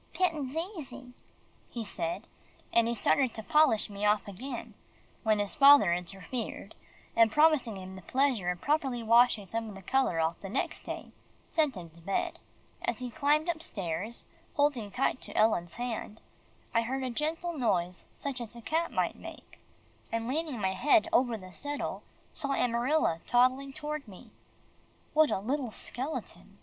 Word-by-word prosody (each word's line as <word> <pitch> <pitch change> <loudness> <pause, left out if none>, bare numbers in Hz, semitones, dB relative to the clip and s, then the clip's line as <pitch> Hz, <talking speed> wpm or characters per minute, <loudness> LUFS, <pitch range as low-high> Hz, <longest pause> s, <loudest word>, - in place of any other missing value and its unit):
"'Pittin's 310 -6 0
easy," 320 -8 -6 0.6
he 235 -2 -5
said, 190 +1 -3 0.5
and 230 -1 +4
he 235 - 0
started 255 +2 +2
to 220 - -6
polish 300 -5 +4
me 200 0 -7
off 210 -1 +3
again, 240 +5 -6 0.5
when 215 -2 +3
his 205 -1 -1
father 280 - +8
interfered, 195 +5 -4 0.4
and 225 -1 +6
promising 300 -7 +4
him 190 0 -8
the 190 - -9
pleasure 255 -4 +1
of 180 -1 -2
properly 270 - 0
washing 230 -2 +5
some 225 +3 -3
of 205 - -9
the 195 - -10
colour 260 -6 +1
off 160 +1 0
the 195 - -7
next - - -2
day, - - -6 0.4
sent 305 -6 +2
him 175 -3 -8
back - - -26
to 170 - -17
bed. 195 +4 -2 0.4
As 240 - -1
he 250 -1 -4
climbed 295 +6 +2
upstairs, 215 - -3 0.3
holding 285 -8 +1
tight 255 +3 0
to - - -5
Ellen's 175 -6 +2
hand, 230 -3 -4 0.5
I 230 - +4
heard 260 +3 -2
a 255 - -2
gentle 325 +6 -2
noise 180 - 0
such 270 -3 -4
as 235 0 -6
a 235 - -9
cat 325 +6 0
might - - 0
make, - - -11 0.5
and 230 0 -1
leaning 295 -2 -2
my 190 -2 0
head 300 - +4
over 245 -7 +3
the 185 -2 -12
settle, 290 +5 -4 0.3
saw 280 -1 -2
Amarilla 240 - +2
toddling 255 +3 +3
toward 300 -1 -5
me. 190 -3 -13 0.8
What 310 0 +5
a - - +1
little 255 +6 -2
skeleton! 255 +7 -5
240 Hz, 165 wpm, -30 LUFS, 205-285 Hz, 0.8 s, father